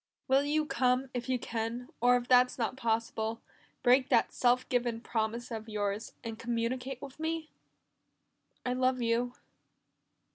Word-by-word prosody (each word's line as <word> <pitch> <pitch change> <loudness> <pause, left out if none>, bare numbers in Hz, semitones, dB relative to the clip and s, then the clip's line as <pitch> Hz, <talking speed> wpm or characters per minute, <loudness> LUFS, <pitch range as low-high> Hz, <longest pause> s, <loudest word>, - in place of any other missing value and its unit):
"Will 270 +1 +4
you 305 +1 +1
come 255 -1 +1
if 245 +1 -4
you 255 - +2
can, 235 +2 -4
or 245 +1 +6
if 245 0 -5
that's 250 0 +5
not 240 +1 -1
possible, 225 -2 -1 0.4
break 255 +1 +5
that - - +3
self 250 0 +2
given 240 -2 0
promise 230 +1 -2
of 220 -1 -5
yours, 205 +1 -2
and 225 -1 -6
communicate 240 +2 -2
with 275 +1 -9
me? 320 0 -3 1.1
"I 250 - +1
love 255 0 +2
you." 240 +2 +1
245 Hz, 145 wpm, -31 LUFS, 230-255 Hz, 1.1 s, or